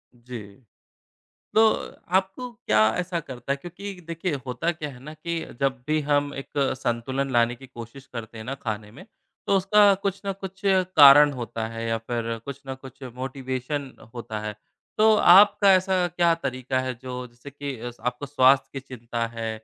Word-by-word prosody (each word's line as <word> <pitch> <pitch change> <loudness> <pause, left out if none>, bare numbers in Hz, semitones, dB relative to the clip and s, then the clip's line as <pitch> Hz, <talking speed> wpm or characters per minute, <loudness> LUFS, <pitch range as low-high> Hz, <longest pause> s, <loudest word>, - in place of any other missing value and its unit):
जी। 120 0 -8 1.2
तो 220 - +7 0.5
आपको 195 +7 0
क्या 235 - 0 0.2
ऐसा 180 -1 -2
करता 130 -4 -6
है? - - -4
क्योंकि 180 +6 -8
देखिए, 165 +1 -3
होता 130 +7 -1
क्या 155 -3 -6
है 125 -3 -12
ना 155 - -7
कि 165 +2 -4 0.2
जब 135 -2 0
भी 155 0 +2
हम 145 0 +2
एक 135 - -7 0.3
संतुलन 130 +2 -2
लाने 120 0 +3
की 135 +2 -14
कोशिश 125 +2 -11
करते 115 -1 -7
हैं 110 - -8
ना 135 +3 -4
खाने 105 -2 -4
में 160 - -13 0.4
तो 200 - +3
उसका 200 +1 +5
कुछ 200 -1 -2
न 195 - 0
कुछ 195 0 -8
कारण 150 -7 +7
होता 115 -3 -4
है 115 0 -6
या 115 - 0
फिर 115 0 -3
कुछ 140 0 -7
न 135 - -4
कुछ 135 0 -13
मोटिवेशन 130 +1 -4 0.2
होता 115 -3 -5
है। 105 0 -4 0.4
तो 220 0 +6
आपका 200 +1 +7
ऐसा 185 -1 +2
क्या 170 0 +2
तरीका 130 -4 -2
है, 130 0 -2
जो 125 +1 -6
जिससे 120 +4 -13
कि 140 -3 -6 0.3
आपको 125 +3 -2
स्वास्थ्य 135 -1 +4
कि 135 - -4
चिंता 120 -3 -4
है 115 -1 -5
135 Hz, 175 wpm, -25 LUFS, 120-175 Hz, 1.2 s, तो